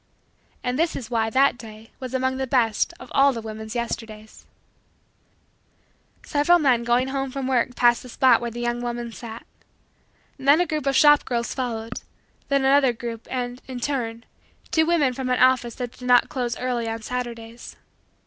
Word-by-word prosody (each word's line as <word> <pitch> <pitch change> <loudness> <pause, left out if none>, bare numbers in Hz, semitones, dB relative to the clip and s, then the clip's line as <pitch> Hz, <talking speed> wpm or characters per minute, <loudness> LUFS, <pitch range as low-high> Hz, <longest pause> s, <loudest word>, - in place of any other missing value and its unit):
And 250 +2 -2
this 330 0 +1
is 250 -1 -7
why 225 -1 +1
that 260 +1 +3
day 220 0 -12
was 260 -1 -5
among 260 0 0
the 265 0 -2
best 235 -2 +1
of - - -12
all 275 0 +5
the 235 - -4
woman's 220 +1 -7
Yesterdays. 220 -2 -6 1.8
Several 295 +4 +3
men 260 -7 +2
going 245 +2 +1
home 270 0 -2
from 270 0 -4
work 250 -1 0
passed 240 -1 +4
the 250 - -11
spot 245 -1 +4
where 240 - -3
the 240 +1 -7
young 240 0 -1
woman 240 -1 -4
sat. 230 0 -9 0.9
Then 280 +4 +5
a 355 - +3
group 305 -4 -3
of 275 - +2
shop 295 0 +6
girls 235 -1 -2
followed; 230 -3 -4 0.5
then 275 -1 +2
another 270 -2 +4
group 230 -1 -7
and, 245 -1 -4
in 255 -2 -6
turn, 235 -4 -3 0.5
two 320 -1 +3
women 305 -7 +2
from 255 0 -4
an 250 - +2
office 255 -2 +3
that 245 -2 -5
did 250 0 -10
not 245 0 +5
close 245 -3 -3
early 245 -2 -2
on 225 0 -5
Saturdays. 235 -1 -6
245 Hz, 175 wpm, -23 LUFS, 235-265 Hz, 1.8 s, shop